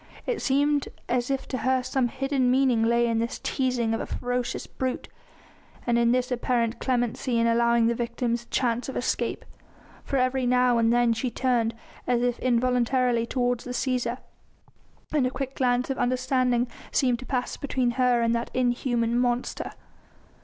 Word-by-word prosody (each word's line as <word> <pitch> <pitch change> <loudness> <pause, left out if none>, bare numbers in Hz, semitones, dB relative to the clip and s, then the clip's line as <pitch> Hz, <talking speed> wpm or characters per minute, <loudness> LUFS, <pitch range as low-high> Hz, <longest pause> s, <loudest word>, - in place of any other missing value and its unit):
It - - -2
seemed 285 +1 +2 0.2
as 245 +1 0
if 270 -1 -2
to 255 - -2
her 260 +2 +1
some 255 -1 0
hidden 270 0 0
meaning 255 -3 +3
lay 235 +1 +3
in 230 -1 +1
this 230 +1 -2
teasing 250 -4 -1
of 225 - -1
a - - -5
ferocious 245 0 -3
brute, 260 -1 -4 0.8
and 240 - +2
in 235 0 +3
this 255 0 0
apparent 240 -1 0
clemency 245 -1 0
in 230 - +3
allowing 235 0 +3
the 235 - +3
victims 235 0 -2
a 235 - -19
chance 245 0 0
of - - -4
escape, - - -2 0.6
for 275 - -2
every 255 0 +1
now 250 -1 +3
and 230 0 +3
then 240 -1 +3
she 230 +3 -2
turned 235 -3 0 0.3
as 245 -1 +2
if 245 -1 0
involuntarily 250 -1 +1
toward 245 -1 0
the 250 +1 -7
Cæsar, 250 -2 -1 1.0
and 280 -4 +3
a - - 0
quick 265 +1 -4
glance 250 0 +1
of 265 - -3
understanding 255 -1 +1 0.2
seemed 250 -3 +2
to 255 - -9
pass 250 -2 -2
between 260 -4 -1
her 250 -1 +2
and 230 0 +2
that 235 0 -2
inhuman 240 -1 +1
monster. 245 0 -1
245 Hz, 170 wpm, -26 LUFS, 235-255 Hz, 1.0 s, meaning